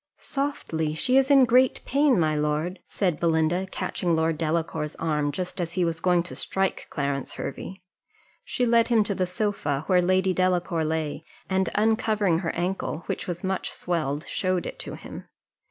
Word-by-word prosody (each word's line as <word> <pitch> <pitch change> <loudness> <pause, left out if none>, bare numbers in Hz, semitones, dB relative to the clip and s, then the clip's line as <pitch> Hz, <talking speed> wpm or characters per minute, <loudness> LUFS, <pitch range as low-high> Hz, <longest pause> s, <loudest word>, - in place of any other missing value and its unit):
"Softly! 165 - -2
she's 265 - +3
in 275 -2 +7
great 250 +2 +3
pain, 280 -4 +3
my 155 -2 +2
lord," 150 +5 -1
said 180 -6 0
Belinda, 170 +2 +1
catching 175 -2 -1
Lord 160 0 +1
Delacour's 160 -1 -2
arm, 150 -3 0
just 180 +4 -4
as 170 -1 -3
he 180 -1 +1
was 165 -1 -2
going 175 -1 +3
to 180 - -6
strike 190 0 -1
Clarence 140 -2 -2
Hervey. 185 +6 -6 0.6
She 250 - -1
led 230 -1 +4
him 230 -3 +4
to 205 - -1
the 185 -1 -1
sofa 180 -7 -1
where 180 0 +4
Lady 185 +1 +2
Delacour 180 -2 +1
lay, 155 -1 -2 0.2
and 190 0 +1
uncovering 215 -4 +2
her 170 -3 -2
ankle, 175 -2 -2
which - - -4
was 175 -1 -4
much 190 0 -1
swelled, 155 -4 -2
showed 185 -2 -1
it - - -6
to - - -5
him. - - -9
180 Hz, 170 wpm, -26 LUFS, 160-195 Hz, 0.6 s, in